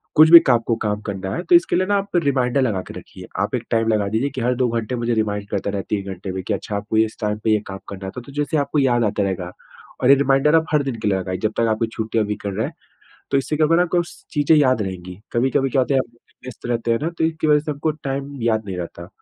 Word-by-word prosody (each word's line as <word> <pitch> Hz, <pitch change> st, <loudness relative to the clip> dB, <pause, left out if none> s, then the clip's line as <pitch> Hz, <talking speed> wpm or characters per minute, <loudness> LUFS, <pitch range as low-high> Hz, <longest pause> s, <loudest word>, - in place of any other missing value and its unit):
कुछ 155 Hz, +1 st, +7 dB
भी 170 Hz, -, +13 dB
काम 120 Hz, -3 st, +5 dB
को 115 Hz, -, +2 dB
काम 105 Hz, -1 st, -1 dB
करना 95 Hz, -1 st, -4 dB
है -, -, -3 dB
तो 355 Hz, -, +7 dB
इसके 345 Hz, +2 st, +3 dB
लिए 185 Hz, -, +2 dB
ना, 205 Hz, -, +2 dB
आप 200 Hz, -1 st, -4 dB
रिमाइंडर 140 Hz, -5 st, +2 dB
लगा 110 Hz, -8 st, 0 dB
के -, -, -9 dB
रखिए। -, -, -13 dB
आप -, -, 0 dB
एक -, -, -3 dB
टाइम 115 Hz, 0 st, +2 dB
लगा 105 Hz, -2 st, +1 dB
दीजिए, 130 Hz, +4 st, -2 dB
हर 125 Hz, +1 st, +2 dB
2 125 Hz, 0 st, +1 dB
घंटे 115 Hz, +1 st, -2 dB
मुझे 120 Hz, 0 st, -1 dB
रिमाइंडर 105 Hz, -2 st, -1 dB
करते 100 Hz, 0 st, -2 dB
रहे, 100 Hz, -1 st, -2 dB
3 100 Hz, -2 st, -1 dB
घंटे 95 Hz, +1 st, -7 dB
में, 95 Hz, 0 st, -4 dB
कि -, -, -2 dB
अच्छा 105 Hz, -, -4 dB
आपको, 105 Hz, +2 st, -2 dB
इस 110 Hz, 0 st, +1 dB
टाइम 105 Hz, -1 st, -1 dB
पे 110 Hz, -, +2 dB
ये 110 Hz, -, +3 dB
काम 95 Hz, 0 st, -7 dB
करना 95 Hz, -1 st, -7 dB
है। 95 Hz, -, -5 dB
तो 120 Hz, -, -13 dB
जैसे 145 Hz, +2 st, -1 dB
आपको 145 Hz, +1 st, 0 dB
याद 120 Hz, -3 st, +2 dB
आता 105 Hz, 0 st, 0 dB
रहेगा, 90 Hz, -2 st, -3 dB, 0.5 s
और 125 Hz, -, +4 dB
ये 140 Hz, -, +9 dB
रिमाइंडर 140 Hz, +2 st, +3 dB
आप, 160 Hz, 0 st, +3 dB
हर 150 Hz, -1 st, +3 dB
दिन 135 Hz, -3 st, -3 dB
के -, -, -1 dB
लिए 95 Hz, -, +1 dB
लगाइए, 95 Hz, 0 st, -3 dB
जब 110 Hz, -, +1 dB
तक 115 Hz, -, +2 dB
आपकी 110 Hz, +1 st, 0 dB
छुट्टी 110 Hz, 0 st, -3 dB
या 110 Hz, -, +3 dB
वीकेंड 105 Hz, -1 st, -4 dB
है। -, -, -1 dB, 0.6 s
तो 140 Hz, -, +3 dB
इससे 135 Hz, +3 st, -1 dB
क्या 155 Hz, -, +4 dB
होगा 165 Hz, +2 st, +3 dB
ना, -, -, +4 dB
आपको 175 Hz, 0 st, +1 dB
स 170 Hz, -, -13 dB, 0.2 s
चीज़ें 150 Hz, +1 st, +4 dB
याद 130 Hz, -6 st, +3 dB
रहेंगी। 90 Hz, -2 st, -6 dB, 0.2 s
कभी-कभी 130 Hz, +3 st, +1 dB
क्या 130 Hz, +1 st, +2 dB
होता 130 Hz, -, 0 dB
है, -, -, +4 dB
आप -, -, -28 dB, 0.3 s
व्यस्त 130 Hz, -, -10 dB
रहते 115 Hz, -1 st, -1 dB
हैं 115 Hz, -, +1 dB
ना, 165 Hz, -, 0 dB
तो 170 Hz, -1 st, -4 dB
इसकी 160 Hz, -1 st, -1 dB
वजह 150 Hz, -1 st, +5 dB
से, 150 Hz, +1 st, -4 dB
आपको 150 Hz, +2 st, -1 dB
टाइम 140 Hz, -1 st, -5 dB
याद 110 Hz, -2 st, +1 dB
नहीं 95 Hz, -2 st, -5 dB
रहता 85 Hz, 0 st, -7 dB
120 Hz, 285 wpm, -21 LUFS, 105-145 Hz, 0.6 s, भी